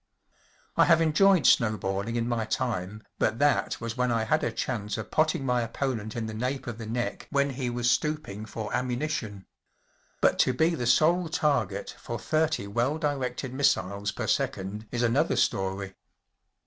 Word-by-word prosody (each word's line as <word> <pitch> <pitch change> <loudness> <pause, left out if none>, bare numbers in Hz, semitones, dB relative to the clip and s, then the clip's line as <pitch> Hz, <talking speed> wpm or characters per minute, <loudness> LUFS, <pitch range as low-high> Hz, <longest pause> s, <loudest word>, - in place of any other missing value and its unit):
I - - +6
have 165 -1 +5
enjoyed 165 +1 +4
snowballing 110 0 +2
in 115 0 0
my 120 -2 0
time, 110 -2 -3 0.2
but 110 +1 +1
that 145 +2 +2
was 115 -1 -4
when 125 -1 +1
I 115 -1 +1
had 110 - +1
a 120 - 0
chance 110 -3 -3
of 110 -1 -6
potting 155 -3 +1
my 125 -1 +2
opponent 115 -2 -3
in 115 -2 -2
the 110 - -5
nape 125 +5 -3
of 120 -2 -6
the 115 - -6
neck 120 +2 -3
when 140 -1 +1
he 130 -1 -3
was 120 0 -1
stooping 125 -9 -2
for 110 -1 -5
ammunition. 120 -6 -3 0.7
But - - +3
to 130 - +4
be 160 +7 +2
the 125 -7 -2
sole 165 +7 +3
target 150 -2 0
for - - -5
thirty 155 -8 0
well 120 +9 0
directed 135 -4 -2
missiles 100 -7 +1
per - - -4
second 105 +3 -2
is 120 0 -1
another 135 +7 +2
story. 95 0 -1
120 Hz, 170 wpm, -27 LUFS, 110-140 Hz, 0.7 s, I